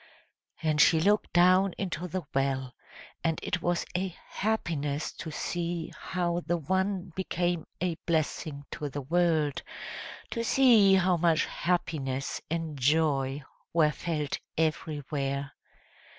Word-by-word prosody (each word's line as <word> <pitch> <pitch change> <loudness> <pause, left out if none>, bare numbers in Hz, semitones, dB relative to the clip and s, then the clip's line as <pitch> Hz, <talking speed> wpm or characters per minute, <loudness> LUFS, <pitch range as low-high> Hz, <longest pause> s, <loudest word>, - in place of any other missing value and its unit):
And 155 -1 +3
she 160 - +6
looked 205 +6 +2
down 185 +2 +5
into 180 -2 -3
the 180 +1 -3
well; 135 -2 0 0.5
and 165 -1 +1
it 175 - -1
was 175 0 0
a 185 -1 -1
happiness 155 -9 -1
to 160 - -7
see 170 +1 -3
how 175 -2 -1
the 175 - +2
one 190 +3 -1
became 175 -3 -1
a 180 -1 0
blessing 155 -3 -1
to 145 - -4
the 145 +1 -4
world, 160 -2 +2 0.7
to 230 - -1
see 230 -6 +6
how 185 -1 +3
much 165 -1 +3
happiness 140 -6 -1
and 160 -3 -3
joy 140 -1 +2 0.3
were 155 -2 +4
felt 150 -4 -2 0.2
everywhere. 145 -3 -1
165 Hz, 120 wpm, -29 LUFS, 150-180 Hz, 0.7 s, she